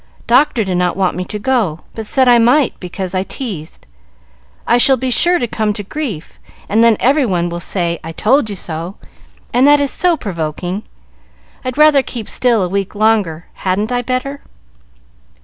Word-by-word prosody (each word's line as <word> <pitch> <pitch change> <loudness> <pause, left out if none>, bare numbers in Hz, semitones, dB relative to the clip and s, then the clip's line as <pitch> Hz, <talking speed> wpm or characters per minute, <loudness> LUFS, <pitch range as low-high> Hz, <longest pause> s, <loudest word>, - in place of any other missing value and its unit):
Doctor 250 -1 +3
did 185 -2 -2
not 180 0 0
want 190 -2 0
me 180 - -3
to 210 - -5
go, 210 -8 -1
but 220 -1 -7
said 260 +2 +2
I 240 -1 +6
might 245 +4 +3
because 185 0 -6
I 185 - 0
teased. 190 - -7 0.8
I 245 - +3
shall 265 +2 +6
be 255 +1 -2
sure 350 +8 +4
to 245 - -1
come 215 -2 -1
to 205 - -6
grief, 205 - -6 0.3
and 220 +3 +3
then 230 -2 +4
every 280 +4 +3
one 175 -7 0
will 170 0 -5
say, 170 -1 -2
'I 165 +1 -7
told 235 - +2
you 205 - -4
so,' 170 +1 -6 0.6
and 255 +3 +4
that 290 0 +6
is 285 -1 0
so 355 -2 +1
provoking. 175 - -4 0.8
I'd 255 0 -4
rather 300 -2 +6
keep 235 -4 -7
still 235 -5 +1
a - - -1
week 195 +2 -3
longer. 205 -7 +1
Hadn't 200 +5 -2
I 245 0 0
better?" 255 +3 -3
215 Hz, 185 wpm, -16 LUFS, 180-255 Hz, 0.8 s, I